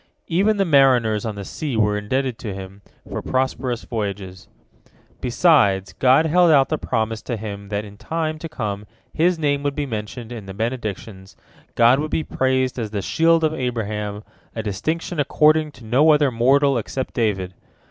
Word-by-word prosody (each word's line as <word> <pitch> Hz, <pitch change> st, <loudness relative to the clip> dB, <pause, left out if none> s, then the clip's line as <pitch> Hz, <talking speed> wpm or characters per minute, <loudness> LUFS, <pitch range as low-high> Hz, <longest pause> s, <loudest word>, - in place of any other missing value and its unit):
Even 200 Hz, +5 st, +2 dB
the 195 Hz, -, +2 dB
mariners 125 Hz, -, +3 dB
on 110 Hz, -, -4 dB
the 100 Hz, -1 st, -7 dB
sea 145 Hz, -, -4 dB
were 105 Hz, -1 st, +2 dB
indebted 125 Hz, +4 st, -2 dB
to 105 Hz, -5 st, -5 dB
him 95 Hz, +1 st, -9 dB, 0.3 s
for -, -, -5 dB
prosperous 130 Hz, -2 st, -2 dB
voyages. 100 Hz, -4 st, -5 dB, 0.7 s
Besides, 120 Hz, -, +3 dB
God 130 Hz, +5 st, +4 dB
held 175 Hz, +2 st, +4 dB
out 140 Hz, -4 st, +5 dB
the 155 Hz, -, -1 dB
promise 110 Hz, 0 st, -2 dB
to 120 Hz, -, -4 dB
him 100 Hz, -2 st, -7 dB
that 105 Hz, 0 st, -2 dB
in 100 Hz, 0 st, -13 dB
time 155 Hz, +3 st, -3 dB
to 165 Hz, -, -6 dB
come 105 Hz, -6 st, -4 dB, 0.3 s
his 175 Hz, +2 st, +2 dB
name 145 Hz, -2 st, 0 dB
would 145 Hz, -1 st, -2 dB
be 145 Hz, -, -2 dB
mentioned 115 Hz, 0 st, -6 dB
in 110 Hz, -5 st, -8 dB
the 95 Hz, -, -8 dB
Benedictions, 110 Hz, -4 st, -5 dB, 0.4 s
God 120 Hz, +3 st, +5 dB
would 155 Hz, +1 st, -2 dB
be 160 Hz, -, -1 dB
praised 130 Hz, -2 st, 0 dB
as 110 Hz, -2 st, -3 dB
the 100 Hz, -2 st, -4 dB
Shield 165 Hz, -, +3 dB
of 155 Hz, 0 st, +2 dB
Abraham, 105 Hz, -6 st, -3 dB, 0.3 s
a 110 Hz, -, -3 dB
distinction 155 Hz, -, -3 dB
accorded 155 Hz, +2 st, +3 dB
to 125 Hz, -2 st, -14 dB
no 130 Hz, +8 st, +4 dB
other 150 Hz, -3 st, +4 dB
mortal 135 Hz, +3 st, +3 dB
except 130 Hz, +4 st, -5 dB
David. 95 Hz, -6 st, -1 dB
125 Hz, 175 wpm, -21 LUFS, 105-150 Hz, 0.7 s, out